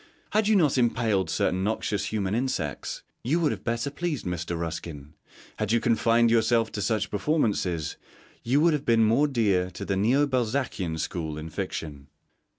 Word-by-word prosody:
Had 215 -1 +2
you 215 - +4
not 150 -8 +3
impaled 115 -7 +1
certain 90 +3 0
noxious 105 -1 -1
human 100 -3 -2
insects, 110 - -2 0.2
you 145 +9 +1
would 160 -3 +2
have - - -5
better 115 +4 -1
pleased 155 -4 -3
Mr. 85 -1 -3
Ruskin; 80 -3 -6 0.4
had 110 -1 -1
you 115 - +4
confined 115 0 +3
yourself 115 0 +3
to 105 - -4
such 110 +1 0
performances, 100 - 0 0.4
you 130 +5 +2
would 165 0 +4
have 150 -2 -1
been 115 -5 +4
more 115 +7 +3
dear 100 -9 +1
to 95 - -7
the 95 - -1
Neo 120 +9 +3
Balzacian 120 - -1
school 80 -1 -3
in 80 +1 -7
fiction. 75 -6 -5
110 Hz, 165 wpm, -26 LUFS, 90-130 Hz, 0.4 s, you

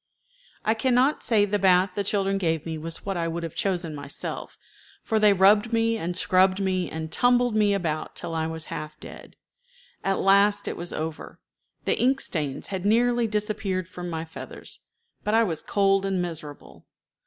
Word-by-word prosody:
I 220 - +3
can 240 +2 +1
not 265 +4 +3
say 215 -3 +3
the 205 0 -1
bath 185 0 +4
the 200 - -1
children 195 0 0
gave 165 -4 -1
me 165 -1 -3
was 165 +1 -6
what 195 -2 -2
I 165 -1 -1
would 170 +1 -4
have 165 - -5
chosen 180 -7 -2
myself, 145 -1 -6 0.5
for 220 -1 +1
they 210 -1 +6
rubbed 205 +4 +4
me 230 0 +2
and 175 -4 -3
scrubbed 185 +1 +3
me 185 -2 0
and 160 0 -5
tumbled 245 -2 +3
me 205 -2 +3
about 155 -5 -3
till 165 - -5
I 160 -1 -1
was 160 -1 -5
half 155 0 -7
dead. - - -11 0.7
At 195 0 +1
last 200 +1 +3
it - - -2
was 175 0 -5
over. 160 0 -5 0.5
The - - +1
ink 265 +2 +3
stains 150 - -3
had 190 -2 -4
nearly 235 +3 +3
disappeared 210 -4 -2
from 180 -1 -7
my 160 -1 -4
feathers, 160 - -9 0.4
but 210 +1 +1
I 230 - +5
was 165 -8 -2
cold 195 -1 +2
and 195 -1 -1
miserable. 160 -4 -7
195 Hz, 185 wpm, -25 LUFS, 165-210 Hz, 0.7 s, they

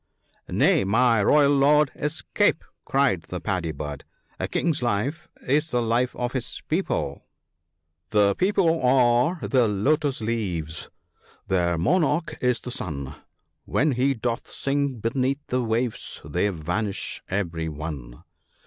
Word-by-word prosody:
" - - -37
Nay! - - +3
my 115 +3 +3
royal 145 +6 +5
Lord, 145 +1 +4
escape! 160 +5 0
" - - -55
cried 135 -10 +2
the 90 - -4
Paddy 90 -3 -2
bird; 75 -1 -6 0.4
a - - -1
king's 160 -5 0
life 125 +9 -1 0.2
is 150 +4 +2
the 125 - +1
life 120 +2 0
of 125 0 -3
his 130 -3 -4
people, 155 - -2 0.3
— 80 0 -54
'* 80 +1 -53
The 105 -2 +4
people 180 - +2
are 125 +5 +3
the 125 -4 +3
lotus 140 +8 +1
leaves, 90 -9 -3 0.6
their 85 -2 +1
monarch 155 - +1
is 125 -1 +2
the 125 - -6
sun 75 - -5 0.3
— - - -50
When 150 +2 +3
he 135 +2 +1
doth 115 +1 -3
sink 140 -4 -2
beneath 130 +4 0
the 125 0 -1
waves 115 0 -2
they 90 +8 0
vanish 95 +4 -3
every 85 -5 -2
one. 75 -6 -7
120 Hz, 145 wpm, -25 LUFS, 90-140 Hz, 0.6 s, royal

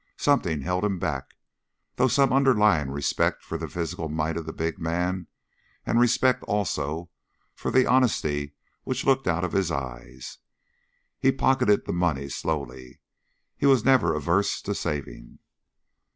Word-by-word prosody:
Something 90 - +1
held 90 +5 -1
him 100 -2 0
back, 70 -7 -4 0.6
through 130 +1 +3
some 135 +1 +3
underlying 105 - +3
respect 70 +1 -1
for - - -5
the - - -4
physical 80 -1 -4
might 80 +1 -2
of 80 -2 -5
the - - -3
big 80 0 -3
man 90 +2 -2 0.6
and 115 - +2
a - - +5
respect, 125 +1 +3
also, 85 -5 -2 0.4
for - - -4
the 130 0 +4
honesty 75 - +1 0.3
which 130 0 -3
looked 135 -1 +2
out 85 +1 +1
of 90 - -2
his 95 -3 +1
eyes. 65 -2 -6 0.8
He 135 - +4
pocketed 130 -5 +2
the - - -3
money 80 -6 -1
slowly. 65 -5 -5 0.6
He 140 - +1
was 135 -5 +4
never 130 -9 +4
averse 85 +7 0
to - - -2
saving. 70 -5 -5
85 Hz, 150 wpm, -25 LUFS, 75-120 Hz, 0.8 s, a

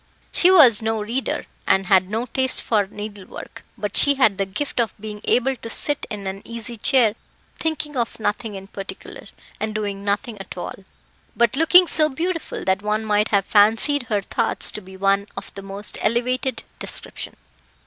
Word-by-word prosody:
She 360 - +5
was 275 - +7
no 220 0 -1
reader, 235 +5 -2 0.2
and 190 0 +3
had 190 -1 +3
no 225 +3 -2
taste 260 +1 +1
for 210 -4 +1
needlework; 205 -1 -9
but 205 -2 -4
she 285 0 +6
had 220 -8 +3
the 195 - 0
gift 250 +8 -4
of 230 -4 0
being 210 0 -7
able 260 +2 +2
to 230 - -8
sit 290 +5 0
in 205 -2 -6
an 190 +1 -5
easy 230 0 -6
chair 230 -1 +3 0.5
thinking 310 -2 -2
of 235 -3 -2
nothing 215 0 -2
in 195 0 -8
particular, 195 0 -9 0.3
and 215 0 -3
doing 200 -2 -3
nothing 205 +2 -2
at 195 - -9
all, 175 - -5 0.6
but 235 +1 +3
looking 325 +5 +7
so 310 -2 +2
beautiful 330 +4 -3
that 190 +1 +1
one 210 +1 -1
might 210 0 +2
have 200 -2 +2
fancied 225 +6 +3
her 205 -3 0
thoughts 230 +3 0
to 210 - -7
be 190 0 -13
of 195 +1 -1
the 195 - -7
most 195 +1 -3
elevated 250 +2 0 0.2
description. - - -6
215 Hz, 175 wpm, -22 LUFS, 200-255 Hz, 0.6 s, was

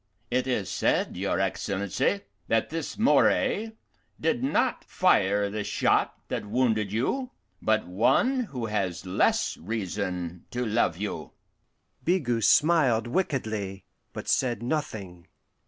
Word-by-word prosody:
It 125 +1 +1
is 115 -7 0
said, - - 0
your - - -1
Excellency, 100 0 0 0.3
that 115 +5 +1
this 165 +2 -4
Moray 225 -1 +3 0.5
did 245 +2 0
not 260 -1 +1
fire 100 - +3
the 105 +1 -3
shot - - +1
that - - -3
wounded 110 -3 +1
you, 245 - -1 0.3
but 110 0 +2
one 245 - +2
who 125 - -5
has 100 -5 -2
less 90 +1 +1
reason 90 -3 -4
to 125 0 -2
love 105 -6 +1
you." 105 +2 -5 0.7
Bigot 120 - +1
smiled 145 -8 +4
wickedly, 110 - -2 0.3
but - - -7
said 120 -4 +1
nothing. 100 - -4
110 Hz, 120 wpm, -27 LUFS, 100-145 Hz, 0.7 s, smiled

